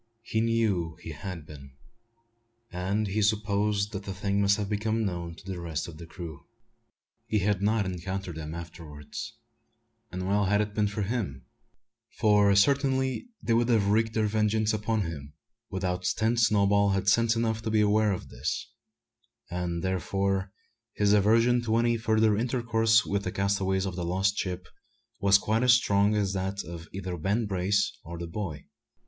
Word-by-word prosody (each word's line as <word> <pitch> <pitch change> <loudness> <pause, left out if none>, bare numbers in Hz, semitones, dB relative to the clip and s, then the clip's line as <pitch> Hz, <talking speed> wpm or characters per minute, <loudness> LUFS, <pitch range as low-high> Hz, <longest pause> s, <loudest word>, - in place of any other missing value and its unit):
He 110 -1 -1
knew 110 -8 0
he 80 - -6
had 80 +2 -7
been; 70 -3 -12 1.0
and 95 +4 -1
he 105 +2 -1
supposed 105 -1 +1
that 95 - -4
the 100 -1 -6
thing 100 +1 0
must 100 0 +3
have 105 -2 -2
become 110 +2 -1
known 85 -3 -4
to 90 - -16
the 95 -2 -5
rest 80 -2 -3
of 80 -2 -10
the 85 - -9
crew. 80 -3 -9 0.8
He 110 - +1
had 100 -1 +1
not 105 0 +2
encountered 95 0 -4
them 80 0 -6
afterwards; 85 +6 -8 0.8
and 90 0 -4
well 100 +1 +2
had 105 +2 +2
it 105 -1 -1
been 105 -1 +1
for 105 +1 -3
him, 95 - -3 0.7
for 105 -2 +4
certainly 130 - +2 0.2
they 115 - +1
would 120 +1 +2
have 105 -4 +3
wreaked 110 +1 +2
their 110 -1 +2
vengeance 110 0 +1
upon 110 +1 0
him 75 -5 -6 0.4
without 90 -1 -2
stint 110 +5 +1
Snowball 100 -2 +4
had 95 0 0
sense 115 +3 +4
enough 115 -1 0
to 110 - -3
be 110 -1 +3
aware 105 0 +3
of 95 - -5
this; 75 +10 -4 0.8
and 85 -1 -3
therefore 95 +1 -1 0.4
his 105 0 +2
aversion 115 +4 +4
to 115 -1 0
any 120 0 +3
further 110 -1 +2
intercourse 115 -1 +2
with 100 0 -1
the - - -3
castaways 95 -1 0
of 95 -2 -4
the 90 - -3
lost 95 +4 +1
ship 90 -3 -3 0.5
was 100 0 +6
quite 110 +3 0
as 125 -1 +6
strong 100 -3 +3
as 100 -2 0
that 95 +1 -2
of 85 0 -8
either 95 -1 -4
Ben 100 +8 0
Brace 100 +1 0
or 85 +1 -7
the 85 - -5
boy. 85 -4 -5
100 Hz, 170 wpm, -28 LUFS, 90-110 Hz, 1.0 s, was